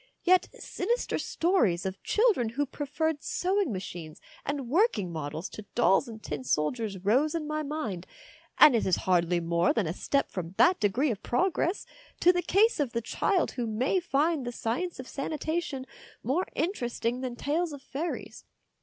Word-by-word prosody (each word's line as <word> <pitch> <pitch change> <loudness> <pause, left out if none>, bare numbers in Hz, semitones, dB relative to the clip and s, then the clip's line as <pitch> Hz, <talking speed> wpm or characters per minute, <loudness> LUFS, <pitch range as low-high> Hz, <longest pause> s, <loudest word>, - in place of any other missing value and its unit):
Yet 370 0 +4
sinister 470 +7 -2
stories 230 - +1
of 190 0 -4
children 420 - +2
who 280 +6 -1
preferred 295 +2 -2
sewing 385 - 0
machines 175 -5 -6 0.2
and 280 -3 -3
working 300 - +2
models 155 +2 -4
to 215 - -9
dolls 235 +1 +4
and 220 -2 -10
tin 150 -3 -4
soldiers 195 - -1
rose 275 +10 +3
in 320 -2 -2
my 305 0 -1
mind, 260 - -4 0.5
and 300 -5 +8
it 225 - +1
is 185 - +4
hardly 175 -1 +3
more 170 +1 +2
than 225 -5 +1
a 160 - -2
step 280 +8 0
from 180 -1 -5
that 365 +1 +5
idegree 240 +8 +2
of 205 - -5
progress 345 +7 0 0.3
to 360 - +6
the 355 - +1
case 420 +4 +3
of 275 -5 0
the 235 - 0
child 365 - 0
who 245 -3 -3
may 250 - +1
find 315 -2 +1
the 245 - -3
science 255 +9 -3
of 260 - -7
sanitation 300 -1 -3 0.4
more 285 - 0
in 330 +5 +1
teresting 240 - -2
than 255 -2 -4
tales 315 +6 -1
of 285 -2 -9
fairies. 320 +6 -5
260 Hz, 170 wpm, -28 LUFS, 205-325 Hz, 0.5 s, and